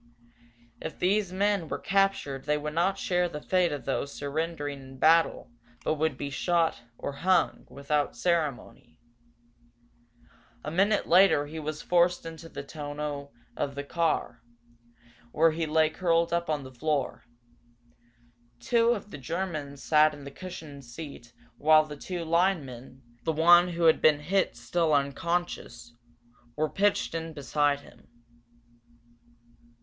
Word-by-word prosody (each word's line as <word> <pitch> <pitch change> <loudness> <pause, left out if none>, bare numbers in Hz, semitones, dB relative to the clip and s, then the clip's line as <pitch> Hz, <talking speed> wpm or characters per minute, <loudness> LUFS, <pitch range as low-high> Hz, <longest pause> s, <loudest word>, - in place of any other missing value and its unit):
If 160 - -6
these 195 +1 +1
men 200 -2 0
were - - -2
captured 195 -9 0
they 150 0 +1
would 150 0 -4
not 175 +4 +1
share 180 -1 0
the 150 - -6
fate 180 +2 +1
of 145 -5 -5
those 140 +1 -2
surrendering 145 0 -3
in 130 0 -12
battle 165 0 +3 0.3
but - - +1
would 155 -3 -1
be 140 0 -4
shot, 165 -2 +1 0.2
or - - -4
hung, 180 +4 +1
without 145 0 -1
ceremony. 150 - -2 1.7
A 150 - -4
minute 200 +5 +2
later 175 -5 +5
he 160 +2 -7
was 155 0 -5
forced 175 0 +2
into 165 0 -9
the 140 - -7
tonneau 145 -1 -6 0.2
of 140 -1 -3
the 140 - -4
car, 155 -6 -1 0.9
where 160 +4 +4
he 160 0 -2
lay 155 0 +3
curled 170 -1 +1
up 170 -1 -1
on 150 -2 -1
the 130 0 -11
floor. 145 +1 -2 1.4
Two 230 - +3
of 205 -2 -7
the 145 - -8
Germans 150 -2 -4
sat 155 -1 +4
in 145 - -12
the 140 - -8
cushioned 155 -4 -9
seat 120 -1 -10 0.3
while 155 +1 +6
the 150 -1 -8
two 175 +3 -5
linemen, 140 -7 -1 0.2
the 160 - 0
one 175 +3 +6
who 170 -1 -3
had 160 -1 +5
been 150 -1 +4
hit 185 -3 0
still 155 +6 +1
unconscious, 140 -3 -2 0.6
were 155 +1 +1
pitched 205 -3 +1
in 165 -1 -4
beside 145 0 0
him. - - -18
155 Hz, 140 wpm, -28 LUFS, 145-175 Hz, 1.7 s, while